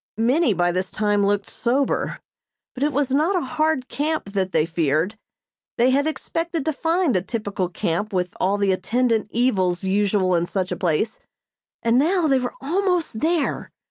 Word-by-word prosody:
Many 245 - +2
by 175 0 +2
this 185 +1 -2
time 205 -1 +1
looked 200 0 +1
sober, 260 +3 -1 0.5
but 255 - -9
it 295 +1 +2
was 285 -2 0
not 310 +8 +2
a 360 - +1
hard 310 -1 0
camp 295 -8 -2
that 190 -2 0
they 155 -3 +2
feared. 165 +3 0 0.6
They 245 +2 +4
had 285 +3 +2
expected 330 0 -3
to 315 - 0
find 330 - +1
a 185 - +2
typical 200 -3 -3
camp 175 +4 -2
with 180 -2 -1
all 195 +2 +1
the 200 -1 +2
attendant 225 +4 +1
evils 190 -8 +1
usual 195 -1 +1
in 170 0 +1
such 185 -1 -2
a - - 0
place, 180 +6 -1 0.6
and 235 +2 +3
now 345 +4 +2
they 270 -3 +3
were 250 -1 -4
almost 350 - 0
there. 320 0 0
225 Hz, 175 wpm, -22 LUFS, 190-290 Hz, 0.6 s, They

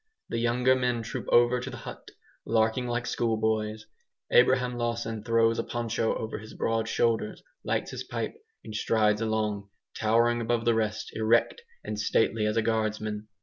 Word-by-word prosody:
The 115 - -1
younger 125 +2 +3
men 125 -2 0
troop 115 - -5
over 120 +1 +5
to 125 - -5
the - - -7
hut, - - -9 0.3
larking 115 +2 +1
like 120 0 -2
schoolboys. 110 -2 -1 0.5
Abraham 125 0 +4
Lawson 115 -2 -2
throws 115 0 +2
a - - 0
poncho 115 -1 -1
over 110 - -4
his 110 +1 -11
broad 115 0 -1
shoulders, 115 -2 0 0.2
lights - - -1
his - - -5
pipe, - - -4 0.3
and 110 - -8
strides 105 -1 +2
along, 105 -2 -1 0.3
towering 115 +2 +2
above 115 0 0
the 120 - +4
rest, 110 -1 -1
erect 115 - +2 0.2
and 105 - -4
stately 110 0 +1
as 105 +1 -1
a 115 - +3
guardsman. 110 -1 -1
115 Hz, 160 wpm, -28 LUFS, 110-120 Hz, 0.5 s, over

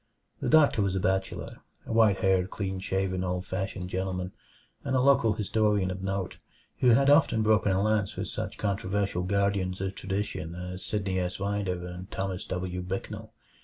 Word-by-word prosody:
The - - -1
doctor 150 -8 +5
was 100 -1 0
a - - +1
bachelor; 95 0 -1 0.3
a - - -4
white 110 -4 +4
haired, 95 -1 +3
clean 95 -2 -3
shaven, 95 0 -1
old 90 0 -2
fashioned 95 0 -4
gentleman, 90 -1 -2 0.5
and 130 -2 -1
a - - +4
local 130 -4 +4
historian 105 -2 +1
of 95 0 -5
note, 95 -1 -3 0.4
who 125 - +3
had 135 +4 +5
often 140 -7 +4
broken 105 -2 +3
a 95 - +2
lance 105 -2 +1
with - - -3
such - - -4
controversial 100 -2 -1
guardians 100 -1 0
of 95 0 -2
tradition 95 -5 -3
as 90 +1 -6
Sidney 100 -3 -1
S. 90 +1 -2
Rider 100 -3 -2
and 90 +2 -8
Thomas 95 -1 -3
W. 90 0 -3
Bicknell. 95 +2 -5
95 Hz, 170 wpm, -28 LUFS, 95-105 Hz, 0.5 s, doctor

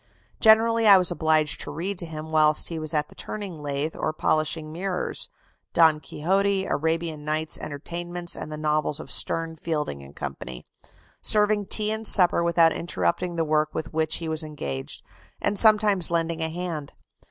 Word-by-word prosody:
Generally 225 0 +4
I 200 -2 +9
was 180 -1 +3
obliged 155 -3 +1
to - - -5
read 180 +5 -5
to 170 - -4
him 160 0 -8
whilst 155 -1 +3
he 165 -2 -5
was 155 -1 -3
at 150 -2 -1
the - - -16
turning 195 -7 -7
lathe, 145 +2 -3
or 155 - -2
polishing 155 0 -1
mirrors 180 +2 -3 0.4
Don 160 -2 +4
Quixote, 195 +6 -1
Arabian 160 -1 -2
Nights' 155 +1 -2
Entertainments, 175 +4 -5
the 155 0 -5
novels 150 -1 -1
of - - -8
Sterne, 165 -1 +1
Fielding, 150 - -4
&c. 65 -3 -7 0.6
serving 210 -1 +3
tea 215 +1 +1
and 220 0 -2
supper 175 -2 +7
without 170 -1 +3
interrupting 170 - -2
the 165 -1 -1
work 155 0 0
with 160 +1 -5
which 160 0 0
he 165 - -3
was 160 0 0
engaged,... 70 - -6 0.4
and 200 -1 -1
sometimes 210 -4 +4
lending 165 -1 -2
a 160 - -1
hand. 165 -4 -6
160 Hz, 165 wpm, -24 LUFS, 155-180 Hz, 0.6 s, I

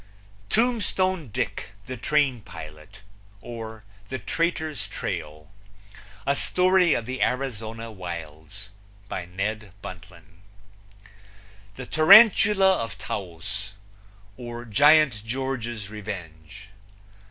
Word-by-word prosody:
Tombstone 190 - +1
Dick, 100 -1 -4
the 130 - -5
Train 135 -1 +1
Pilot; 75 +3 -11 0.4
or, 110 -1 -8 0.3
The 130 - -3
Traitor's 160 -1 -2
Trail. 75 +3 -6 0.7
A 140 +1 +2
story 180 +1 +3
of 115 - -2
the 130 +1 -5
Arizona 115 -3 -2
Wilds. 85 +1 -8 0.4
By 90 - -4
Ned 100 +2 -4
Buntline. 90 0 -12 1.3
The 130 - -7
Tarantula 195 - +7
of 105 -4 -7
Taos; 100 +2 -5 0.6
or, 120 -1 -7
Giant 140 0 +5
George's 120 -4 -4
Revenge. 95 -2 -8
110 Hz, 90 wpm, -25 LUFS, 95-145 Hz, 1.3 s, Tarantula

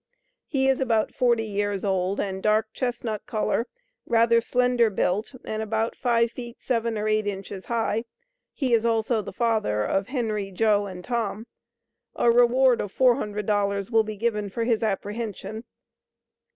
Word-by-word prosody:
he 265 -2 +1
is 265 -1 +3
about 230 -5 +1
40 240 -3 +2
years 205 -2 -2
old 190 0 0
and 190 -1 -2
dark 215 +1 +1
chesnut 240 -4 -3
coller 225 +2 0 0.4
rather 230 0 +4
slender 245 -1 +2
built 205 +5 -1
and 215 0 -3
about 220 +1 -1
five 235 -2 +2
feet 240 -1 -9
seven 230 -3 -1
or 210 0 -1
eight 215 -1 +1
inches 195 -1 -5
high, 225 -1 -1 0.5
he 260 -5 -1
is 230 -1 +4
also 225 0 +1
the - - -7
Father 220 - 0
of 195 - 0
Henry, 220 -7 -2
Joe 205 +1 +2
and 180 -2 -8
Tom. 225 -2 -2 0.7
A 235 - +4
reward 245 +1 +4
of 205 - -5
$400. 205 -4 +1
will 225 -1 +4
be 215 -1 -6
given 210 -2 -1
for 230 +4 -3
his 230 -2 +1
apprehension. 215 +1 -3
220 Hz, 150 wpm, -25 LUFS, 205-235 Hz, 0.7 s, rather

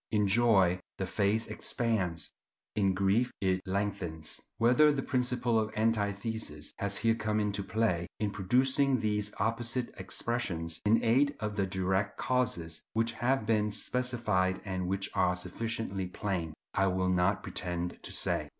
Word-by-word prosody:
In 105 -2 +2
joy 95 -4 +4 0.2
the 95 - -2
face 105 +4 +1
expands, 95 - -1 0.4
in 95 -3 +2
grief 100 +6 +2
it 95 -1 +1
lengthens. 95 -5 -2 0.2
Whether 125 +6 +5
the 140 -2 -1
principle 125 -2 +1
of 110 0 -1
antithesis 105 -6 -1
has 100 0 +1
here 115 0 +3
come 110 -1 -1
into 105 -1 -1
play 95 -4 0
in 105 -2 0
producing 130 +6 +2
these 105 -1 0
opposite 120 +4 -1
expressions, 85 -9 -2
in 115 +2 +4
aid 140 +5 +3
of 105 0 -3
the 100 -2 0
direct 95 +2 -1
causes 90 -11 -1
which 115 +1 +1
have 125 -1 0
been 105 -1 +2
specified 105 -5 0
and 95 -2 -2
which 95 +1 -1
are 90 -2 +2
sufficiently 95 +1 -3
plain, 90 -4 -3 0.2
I 95 - +2
will 95 0 +1
not 90 +3 +2
pretend 90 -1 -4
to - - -8
say. - - +1
105 Hz, 145 wpm, -31 LUFS, 95-115 Hz, 0.4 s, Whether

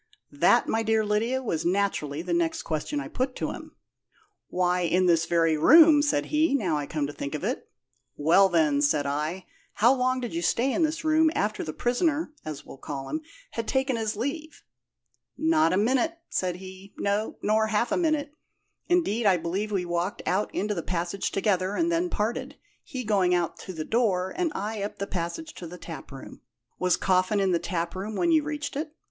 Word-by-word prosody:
"That, - - +3
my 225 - +1
dear 220 -1 +1
Lydia, 230 +5 0
was 165 -10 -2
naturally 170 -5 0
the 175 -1 -2
next 170 -1 0
question 160 - -2
I - - -5
put 255 0 -2
to - - -2
him. - - -10 0.7
'Why, 180 0 +1
in 180 +1 +2
this 165 -2 +3
very 165 -2 +3
room,' 305 - +7
said 290 - +1
he, 305 -1 +3
'now 185 - 0
I 145 -1 -2
come 150 -2 -2
to 145 - -6
think 140 +1 -5
of 150 - -5
it.' - - -3 0.5
'Well, 175 +6 +5
then,' 155 -5 +2
said 145 0 +2
I, 155 +6 -2 0.3
'how 235 +5 +4
long 255 0 +1
did 245 +2 -5
you 335 - -2
stay 260 -4 +1
in - - 0
this 315 0 0
room 315 0 +4
after 210 +1 -1
the 155 - -4
prisoner 295 - 0
(as 150 -2 -7
we'll 135 - -12
call 135 -2 -6
him) 310 - -2 0.3
had 230 -1 -4
taken 265 -1 +1
his 220 -2 -2
leave?' 295 +7 -5 0.7
'Not 315 - +3
a 185 - +2
minute,' 260 +10 +1
said 180 -2 -1
he; 190 +2 -11
'no, 205 +2 -1
nor 220 +1 +2
half 220 +2 0
a - - +2
minute. 310 -4 0 0.5
Indeed, 240 - +2
I 190 -2 +5
believe 190 +6 -3
we 190 -3 0
walked 175 +3 -2
out 200 +3 0
into 210 +1 -1
the 175 - -3
passage 175 +3 -2
together, 195 -1 0
and 335 0 +1
then 340 +2 +1
parted, 255 +4 -2 0.3
he 260 -6 -6
going 195 -5 +2
out 175 -2 -1
to 190 - -7
the 160 -3 -5
door, 190 -6 +1
and 350 -3 0
I 210 +1 -3
up 205 +1 -4
the 200 - -3
passage 195 - -4
to 175 - -8
the 180 +2 -9
taproom.' 155 -6 -10 0.4
'Was 180 -1 +2
Coffin 185 +2 +2
in 195 -1 +2
the 170 - +2
taproom 180 +4 -3
when 345 +6 +2
you 315 -1 +5
reached 300 -1 -4
it?' 300 +2 -4
205 Hz, 200 wpm, -26 LUFS, 175-265 Hz, 0.7 s, room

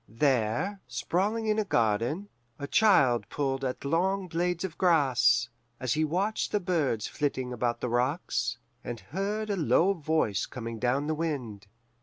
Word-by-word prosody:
There, 135 - 0
sprawling 195 - -1
in 215 0 +1
a - - +2
garden, 120 - 0 0.3
a 140 - -5
child 140 - +4
pulled 135 -2 -2
at 130 +1 -3
long 185 +6 +1
blades 175 +1 -1
of 180 -4 -4
grass, 140 -9 +3 0.3
as 130 -2 0
he 155 - +1
watched 190 +8 -1
the 210 - +2
birds 155 - 0
flitting 130 -4 -2
about 120 0 -1
the 125 - -1
rocks, 125 +8 0 0.3
and 120 -1 -5
heard 205 - -3
a - - +1
low 180 +2 +3
voice 155 - 0
coming 115 -2 -6
down 130 +4 +1
the 155 - 0
wind. 130 -11 -4
145 Hz, 155 wpm, -28 LUFS, 125-185 Hz, 0.3 s, child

